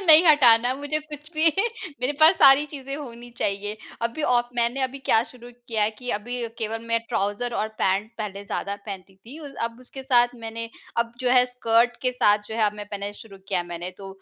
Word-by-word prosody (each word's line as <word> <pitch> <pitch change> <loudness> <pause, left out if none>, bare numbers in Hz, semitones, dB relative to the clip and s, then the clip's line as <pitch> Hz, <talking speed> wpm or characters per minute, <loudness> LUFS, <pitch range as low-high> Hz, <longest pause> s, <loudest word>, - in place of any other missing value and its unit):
नहीं 320 +2 +9
हटाना 245 -5 +6
मुझे 290 +2 -2
कुछ 300 0 -11
भी। 315 +1 +2 0.5
मेरे 255 +3 0
पास 320 +4 +7
सारी 275 +2 +7
चीज़े 275 -2 -7
होनी 240 -4 -9
चाहिए। 205 +1 -1 0.3
अभी 235 +7 -2
औ 245 -4 +4 0.2
मैंने 240 +3 +1
अभी 260 +1 -2
क्या 225 -4 +3
शुरू 245 -1 -13 0.2
किया 220 -2 +1
है 210 - +2
कि 245 +3 -6
अभी 245 +4 -6 0.2
केवल 225 0 -2
मैं 230 - +3
ट्राउज़र 205 +5 -1
और 215 - -1
पैंट 195 +4 +1
पहले 200 -2 -5
ज़्यादा 200 0 -3
पहनती 195 -1 -8
थी। 240 +10 -12
उ 290 - -8 0.2
अब 230 0 -4
उसके 265 +1 -10
साथ 245 -2 +3
मैंने 230 +1 -5 0.3
अब 230 0 -16
जो 250 -1 +1
है 250 -1 +6
स्कर्ट 240 -1 +2
के 255 0 +1
साथ 210 -4 +4
जो 220 - -5
है 225 - 0
अब 205 - 0
मैं 205 - -7
पहनना 200 0 -4
शुरू 205 -3 -12
किया 185 -3 +1
है 175 - -7
मैंने। 175 +1 -6
तो 195 - -8
235 Hz, 215 wpm, -24 LUFS, 210-265 Hz, 0.5 s, नहीं